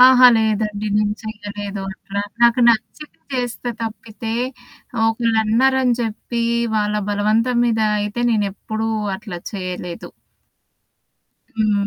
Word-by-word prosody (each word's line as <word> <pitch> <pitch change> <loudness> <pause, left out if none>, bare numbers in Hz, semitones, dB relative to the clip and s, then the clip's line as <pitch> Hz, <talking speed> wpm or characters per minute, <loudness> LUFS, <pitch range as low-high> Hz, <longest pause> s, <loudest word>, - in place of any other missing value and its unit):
అహా! 255 0 +9
లేదండి 215 -1 0
నేను 210 0 +2
చేయలేదు 205 -2 -6
అట్లా. 200 +1 -5 0.2
నాకు 235 +1 +5
నచ్చితే 235 +6 -1 0.2
చేస్తే 245 -1 -2
తప్పితే, 225 0 -5 0.7
ఒకళ్ళన్నారని 235 +3 +2
చెప్పి, 235 +1 -3 0.3
వాళ్ళ 210 0 +1 0.2
బలవంతం 220 +4 +2
మీద 225 -2 +1 0.2
అయితే 210 +3 -2
నేను 210 -3 +2
ఎప్పుడూ 220 +3 -4 0.3
అట్లా 195 -3 -7
చేయలేదు. 180 -3 -5 1.5
హ్మ్. 210 -2 +2
220 Hz, 100 wpm, -20 LUFS, 205-235 Hz, 1.5 s, అహా